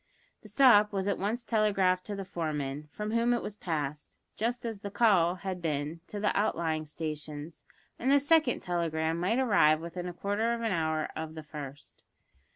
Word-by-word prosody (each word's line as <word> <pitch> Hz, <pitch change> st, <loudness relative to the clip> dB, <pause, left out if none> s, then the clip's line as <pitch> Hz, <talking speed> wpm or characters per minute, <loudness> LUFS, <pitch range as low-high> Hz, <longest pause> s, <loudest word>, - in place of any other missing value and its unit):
The 215 Hz, -, -13 dB
"stop" 210 Hz, -2 st, +6 dB
was 195 Hz, -1 st, -2 dB
at 200 Hz, -, 0 dB
once 225 Hz, +5 st, -2 dB
telegraphed 195 Hz, -5 st, +2 dB
to 205 Hz, -, -3 dB
the 195 Hz, -1 st, -5 dB
foremen, 150 Hz, -4 st, -3 dB
from 210 Hz, +7 st, -4 dB
whom 235 Hz, +1 st, +2 dB
it 240 Hz, -, -3 dB
was 205 Hz, -, -5 dB
passed 150 Hz, -6 st, -4 dB, 0.2 s
(just 235 Hz, +2 st, -2 dB
as 225 Hz, -3 st, -4 dB
the 200 Hz, -, -6 dB
"call" 190 Hz, -6 st, +3 dB
had 185 Hz, -1 st, -5 dB
been) 155 Hz, 0 st, -2 dB
to 210 Hz, -, -5 dB
the 210 Hz, -, +1 dB
outlying 165 Hz, -6 st, 0 dB
stations, 150 Hz, 0 st, -6 dB, 0.3 s
and 255 Hz, -, 0 dB
this 285 Hz, 0 st, +4 dB
second 315 Hz, -6 st, +4 dB
telegram 165 Hz, -2 st, -1 dB
might 190 Hz, +7 st, +1 dB
arrive 200 Hz, -12 st, +4 dB
within 175 Hz, +2 st, -5 dB
quarter 205 Hz, +6 st, 0 dB
of 230 Hz, -, -6 dB
an 225 Hz, -2 st, 0 dB
hour 160 Hz, -3 st, 0 dB
of 160 Hz, 0 st, -5 dB
the 155 Hz, -, -7 dB
first. 145 Hz, -2 st, -9 dB
185 Hz, 180 wpm, -30 LUFS, 160-215 Hz, 0.3 s, stop